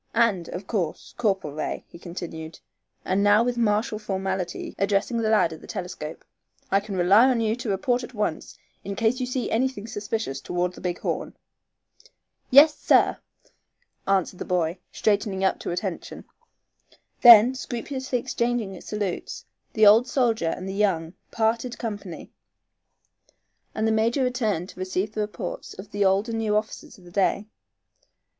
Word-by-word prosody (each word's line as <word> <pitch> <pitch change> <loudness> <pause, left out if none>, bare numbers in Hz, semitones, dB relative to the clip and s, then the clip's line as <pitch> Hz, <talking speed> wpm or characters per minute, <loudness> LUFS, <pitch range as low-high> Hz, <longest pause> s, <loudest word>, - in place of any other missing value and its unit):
And, 200 -8 +2
of 185 +2 -6
course, 185 -7 -3
Corporal 195 -10 -1
Ray," 155 - -4
he 170 - -14
continued, 165 -2 -7 0.5
and 190 +2 +1
now 205 +2 +5
with 245 0 -1
martial 215 0 0
formality 190 -3 -3
addressing 200 +4 +1
the 220 -1 0
lad 205 -7 +3
at 160 - -11
the - - -13
telescope, 175 -5 -6 0.5
"I 195 - +4
can 200 -1 -6
rely 195 +7 +6
upon 255 -3 +2
you 220 0 +1
to 245 -2 -5
report 240 +6 0
at 245 - -9
once 210 -7 -3 0.3
in 200 0 -5
case 230 +5 +1
you 255 - -2
see 250 0 -2
anything 245 -2 0
suspicious 205 -10 -4
toward 180 +4 -2
the - - -12
Big 180 -1 -2
Horn." - - -3 1.1
"Yes, 295 +4 +8
sir," - - +3 0.9
answered 190 -2 +1
the - - -3
boy, 175 -1 -1
straightening 205 -2 0
up 190 - +1
to - - -5
attention. 180 0 -5 1.0
Then, 240 +1 +9
scrupulously 260 +1 -4
exchanging 240 -5 -2
salutes, 205 -4 -4 0.3
the 215 -1 +4
old 220 +5 +7
soldier 230 -10 +1
and 185 +3 -4
the 190 - -4
young 185 -5 0 0.2
parted 230 +2 -1
company, 205 -6 -6 1.4
and 220 +1 0
the - - +2
major 230 +5 +2
returned 220 -8 -1
to - - -13
receive 185 +2 -2
the 215 - -2
reports 210 -3 -5
of 195 +2 -11
the 205 -1 0
old 195 +3 +2
and 225 -1 -2
new 215 -2 0
officers 215 +1 -3
of 185 - -18
the 175 - -14
day. 200 +2 +1
205 Hz, 160 wpm, -25 LUFS, 185-230 Hz, 1.4 s, Then